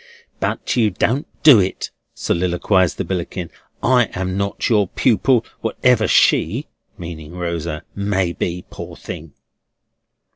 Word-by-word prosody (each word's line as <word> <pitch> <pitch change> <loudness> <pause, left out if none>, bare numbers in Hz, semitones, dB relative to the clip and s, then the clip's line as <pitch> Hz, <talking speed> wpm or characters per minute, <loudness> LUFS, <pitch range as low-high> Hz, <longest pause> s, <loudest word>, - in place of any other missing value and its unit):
"But - - -1
you 115 -4 +3
don't 120 +8 0 0.2
do 145 -8 +9
it," 95 0 -2 0.2
soliloquised 90 +1 +1
the - - -2
Billickin; 90 -1 -4 0.3
"I 125 -1 +4
am 95 0 -2
not 100 0 -1
your 105 -4 +3
pupil, 120 +3 +2
whatever 115 0 +2
she," - - +3 0.3
meaning 85 -2 -8
Rosa, 85 -2 -3
"may 95 -3 0
be, 90 0 -3
poor - - -8
thing!" 75 -1 -8
95 Hz, 120 wpm, -20 LUFS, 85-110 Hz, 0.3 s, do